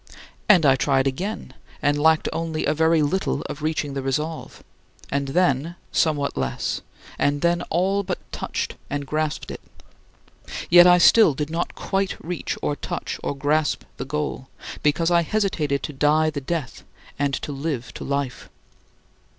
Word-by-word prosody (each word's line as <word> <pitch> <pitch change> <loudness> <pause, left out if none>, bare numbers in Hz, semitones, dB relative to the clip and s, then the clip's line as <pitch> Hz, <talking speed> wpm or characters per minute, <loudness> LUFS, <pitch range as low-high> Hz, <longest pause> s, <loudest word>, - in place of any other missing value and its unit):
And 180 -7 +7
I 135 -1 +6
tried 135 0 +2
again, 140 +2 -3 0.3
and 145 0 +2
lacked 160 +2 +3
only 165 -1 -2
a 150 - +2
very 160 0 +3
little 190 +7 -1
of 150 - -7
reaching 155 -2 -1
the 135 - -3
resolve 150 +4 -3 0.5
and 140 0 0
then 165 0 +1 0.2
somewhat 145 -3 +1
less, 65 -2 -2 0.4
and 145 0 +1
then 175 0 +2
all 190 +4 +1
but 200 - -3
touched - - -4
and 145 0 -3
grasped 155 +1 -2
it. - - -8 1.1
Yet 175 +1 +9
I 180 0 +7
still 180 -3 +6
did 150 +2 -3
not 170 +1 -2
quite 195 0 -1
reach 175 0 -4
or 145 - 0
touch - - -5
or 140 - -2
grasp 150 +2 +1
the - - -4
goal, 145 -2 -3 0.3
because 160 +3 +2
I 170 0 +5
hesitated 160 -8 0
to 150 - -4
die 155 +3 +3
to 145 -2 -4
death 150 -2 -4 0.4
and 140 -1 +1
to - - -5
live 140 -3 -4
to - - -7
life. 140 -3 -3
150 Hz, 160 wpm, -23 LUFS, 140-170 Hz, 1.1 s, Yet